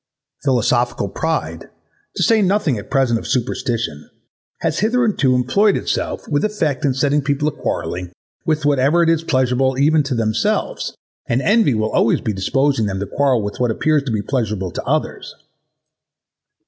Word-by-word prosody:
Philosophical 120 -4 +1
pride, 160 +11 -3 0.5
to - - 0
say 225 -2 +4
nothing 195 - +1
at 105 +4 -8
present 130 -4 +2
of - - -8
superstition, 115 - -2 0.5
has - - 0
hitherto 215 - +2
employed 195 - +2
itself - - -3
with 145 0 0
effect 160 -11 -1
in 135 -3 +1
setting 145 +2 +1
people 145 +1 0
a - - +1
quarrelling 90 -8 -4 0.3
with 155 -2 -1
whatever 145 +4 +3
is 165 -1 +2
pleasurable 130 -2 +1
even 150 +3 +4
to 140 -2 -2
themselves, 110 -2 -1 0.3
and 120 - +1
envy 210 - +3
will 110 0 -1
always 115 - +2
be 110 - -2
disposing 135 +4 +1
them 95 -1 -3
to 100 - -2
quarrel 130 +1 +1
with 100 0 -5
what 125 -1 +1
appears 155 +6 +1
to 135 -3 -4
be 105 -2 -1
pleasurable 105 -7 -2
to - - -5
others. - - -2
135 Hz, 160 wpm, -19 LUFS, 115-155 Hz, 0.5 s, say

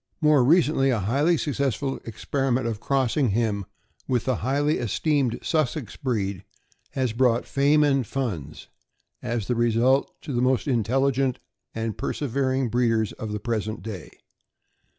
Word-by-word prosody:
More 150 -4 +4
recently, 150 -2 +3
a 125 - +2
highly 140 - +2
successful 140 -2 -1
experiment 130 +2 -1
of 115 -3 -2
cross 135 -1 0
ing 140 -6 +2
him 105 -2 0 0.4
with 125 -3 0
the 130 -3 +1
highly 145 +5 0
esteemed 130 - 0
Sussex 155 - -1
breed 100 - -2 0.5
has 130 -4 -1
brought 120 -1 +2
fame 145 +2 +3
and 135 -2 +2
funds, 110 - -4 0.5
as 115 -3 -2
the 125 - 0
result, 120 +3 +2
to 140 - -5
the 120 - +1
most 130 +3 +1
intelligent 130 +2 +1 0.4
and 110 -1 -3
persevering 130 -2 -1
breeders 115 -2 +1
of 110 - -6
the 105 - -3
present 110 -1 -3
day. 100 -7 -7
125 Hz, 140 wpm, -25 LUFS, 115-140 Hz, 0.5 s, More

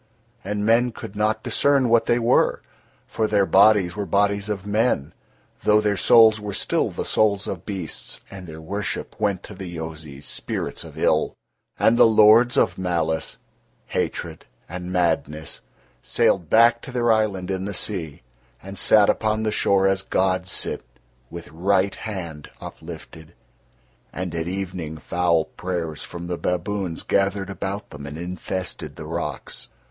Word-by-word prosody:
And 105 +1 -2
men 120 +2 +3
could 105 - -9
not 110 +1 0
discern 140 -3 +3
what 115 -1 +3
they 120 - +3
were, 120 +1 +2 0.4
for 110 - -1
their 105 -2 +3
bodies 95 -2 +5
were 100 -1 -3
bodies 100 +2 +1
of 100 -2 -3
men, 105 - +1 0.5
though 105 0 +4
their 105 -1 +1
souls 110 +3 +6
were 105 -2 -4
still - - +1
the - - -5
souls 100 -2 +2
of 90 -3 -6
beasts 95 -6 -5
and 95 -2 -9
their 80 0 -9
worship 100 +5 -4
went 100 -3 0
to - - -9
the 95 -1 -7
Yozis, 80 -3 -7
spirits - - -3
of - - -12
ill. - - +1 0.4
And 115 +2 +3
the - - +8
lords 110 +3 +6
of - - +2
malice, 85 -3 -1 0.5
hatred - - -3 0.2
and 90 +1 -6
madness 80 -3 -1 0.4
sailed 85 -5 +1
back 115 +1 +5
to 135 - -9
their 120 -2 +2
island 100 -4 0
in 95 0 -2
the 100 - -3
sea 90 - -3 0.4
and 95 +1 -6
sat 105 -2 +5
upon 110 0 +1
the 110 - 0
shore 100 -2 +2
as 95 0 +2
gods 95 -1 0
sit, - - -2 0.5
with 85 0 -8
right 95 +3 +1
hand 85 -8 -7
uplifted; 80 0 -10 0.8
and 90 -1 -5
at 85 0 -3
evening 90 -4 -4
foul 85 0 +1
prayers 85 -4 -4
from 85 0 -8
the 85 -1 -4
baboons 90 0 -2
gathered 100 0 0
about 100 +1 -5
them 70 0 -8
and 75 +2 -7
infested 90 +1 -4
the 75 - -8
rocks. 75 -3 -5
95 Hz, 155 wpm, -23 LUFS, 85-105 Hz, 0.8 s, the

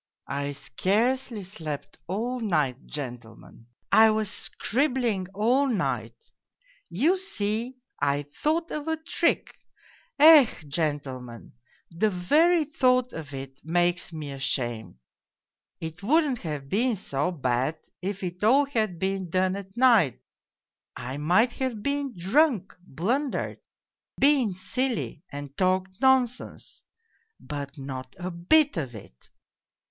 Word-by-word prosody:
" - - -53 0.2
I 145 - -3
scarcely 220 - 0
slept 160 -6 -7
all 235 +8 -2
night, 150 - -1
gentlemen. 120 -5 -8 0.2
I 220 0 +7
was 215 -2 0
scribbling 240 -8 0
all 245 +7 +3
night: 130 - -1 0.7
you 315 - +2
see, 235 - -3 0.2
I 145 0 +1
thought 330 +2 0
of 300 0 -4
a 320 0 0
trick. 320 - 0 0.6
Ech, 295 - +7
gentlemen, 140 -6 -4 0.4
the 185 +6 +1
very 305 - +3
thought 255 -3 +2
of 145 -4 -7
it 135 0 -8
makes 175 +2 0
me 155 -3 -6
ashamed. 125 -5 -2 0.8
It 160 +1 -7
wouldn't 280 +2 +2
have 150 -5 -5
been 230 - +1
so 145 -5 -1
bad 135 -2 -1 0.2
if 195 +1 -4
it 180 +2 -5
all 270 +7 +5
had 220 -10 -1
been 190 0 -2
done 185 +2 +1
at 195 +1 -9
night 230 - +4 0.8
I 130 +3 -5
might 180 +11 +3
have 250 -6 -2
been 280 -3 -2
drunk, 210 - +2 0.2
blun 245 - 0
dered, - - -4 0.6
been 270 -9 +3
silly 245 - -2
and 145 -1 -7
talked 185 +1 0
nonsense 260 -2 +1 0.6
but 145 0 -6
not 130 -2 -7
a 180 +1 -4
bit 275 - +3
of 130 -7 -3
it 65 - -14
190 Hz, 120 wpm, -26 LUFS, -, 0.8 s, I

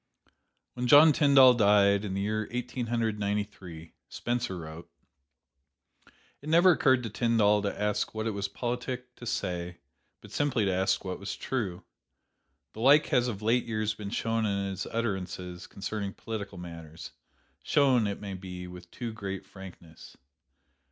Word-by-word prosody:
When 125 0 -3
John 150 +3 +8
Tyndall 140 -4 +7
died, 100 -3 +4
in 95 -2 -4
the 100 - -1
year 110 +1 -1
Eighteen 125 0 -4
Hundred 115 -2 -1
Ninety 105 0 0
three, 85 -5 -12 0.2
Spencer 120 -5 -3
wrote: 80 0 -9 1.5
"It 150 - -7
never 170 +3 +6
occurred 130 -6 +3
to 115 - -4
Tyndall 105 -3 +3
to 100 0 -3
ask 105 0 0
what 110 0 -3
it 115 - 0
was 100 -1 -3
politic 125 +3 -4
to 120 - -9
say, 90 -5 -3 0.4
but - - -15
simply 135 -7 0
to 95 - +1
ask 95 +1 0
what 95 -1 -4
was 100 -1 -5
true. 105 -10 -3 0.9
The - - -11
like 140 +6 +6
has 125 -4 +2
of 105 -3 -5
late 120 +3 +2
years 110 -1 -1
been 105 -2 -7
shown 115 0 -1
in 100 -2 -1
his 95 - -5
utterances 95 -5 -4
concerning 100 0 -5
political 100 -4 -6
matters 85 -2 -9 0.5
shown, 130 -7 +3
it 100 - -4
may 100 -2 -6
be, 90 -1 -7
with 90 -1 -11
too 115 +2 -6
great 95 -3 -6
frankness. 90 -4 -13
105 Hz, 160 wpm, -29 LUFS, 95-120 Hz, 1.5 s, John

